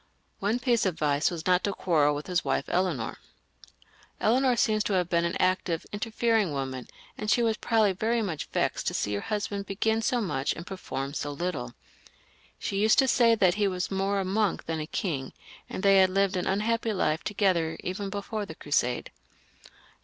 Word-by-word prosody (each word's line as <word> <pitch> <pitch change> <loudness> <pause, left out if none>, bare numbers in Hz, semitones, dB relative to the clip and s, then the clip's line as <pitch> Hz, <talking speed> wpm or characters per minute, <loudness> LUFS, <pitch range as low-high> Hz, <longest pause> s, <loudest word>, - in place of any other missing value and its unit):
One 205 +4 +1
piece 240 -4 +2
of 180 - -1
advice 150 -1 +1
was 170 -2 -6
not 180 0 +3
to 200 - 0
quarrel 150 -6 +2
with 145 - -5
his 180 -1 0
wife - - 0
Eleanor. 175 -11 -1 1.0
Eleanor 250 +3 +3
seems 215 -2 +2
to 205 - 0
have 180 -2 +1
been 170 0 +2
an 170 - -1
active, 185 -2 +1
interfering 220 -3 0
woman, 130 -2 -4 0.3
and 215 - -3
she 240 - +3
was 225 -1 +2
probably 220 -3 +2
very 225 +4 0
much 170 -7 -4
vexed - - -1
to - - 0
see 105 - -1
her 100 - -1
husband 205 -1 -3
begin 220 +3 0
so 245 +1 +1
much 145 - -1
and 165 - -8
perform 140 -8 -5
so 145 - -3
little. 145 -6 -4 0.8
She 195 - -3
used 215 +1 +4
to 270 - +5
say 235 -3 +5
that 185 -5 +4
he 205 +1 +1
was 180 -1 -2
more 195 +1 0
a 195 - -1
monk 200 +1 0
than 160 -1 -2
a 155 - -4
king, 140 -9 -3 0.4
and - - -5
they 195 -1 +6
had 190 0 +5
lived 195 0 +1
an 180 - -1
unhappy 225 +3 0
life 160 -4 0
together 180 -6 +1
even 195 +2 -3
before 205 +1 -4
the 160 - -8
Crusade. 125 -5 -1
190 Hz, 190 wpm, -28 LUFS, 160-215 Hz, 1.0 s, they